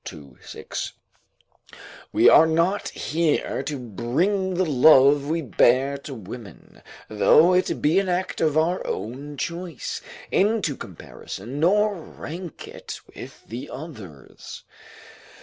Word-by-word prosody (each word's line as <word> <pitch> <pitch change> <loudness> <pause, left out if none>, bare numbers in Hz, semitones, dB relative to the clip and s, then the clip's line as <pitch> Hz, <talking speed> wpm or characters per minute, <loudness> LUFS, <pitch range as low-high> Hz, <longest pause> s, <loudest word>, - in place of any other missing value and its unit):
2, 70 -4 -10
6.] - - -6 1.2
We - - +4
are 160 - +7
not 170 +5 +1
here 160 -1 -1
to 150 - -4
bring 150 - -1
the 185 +1 +1
love 140 0 +5
we 165 +1 -1
bear 130 +4 +3
to 140 -1 -8
women, 110 -2 -11 0.3
though 110 - +5
it 180 0 0
be 160 +6 +4
an 195 -1 -2
act 180 +1 -2
of 155 -1 +2
our 170 +4 +1
own 140 +6 -5
choice, 170 -1 -5 0.3
into 200 -7 +1
comparison, 105 - -8
nor 205 +6 +3
rank 170 +1 -9
it - - -8
with - - -11
the 125 +5 -7
others. 105 - -10
150 Hz, 120 wpm, -24 LUFS, 125-175 Hz, 1.2 s, are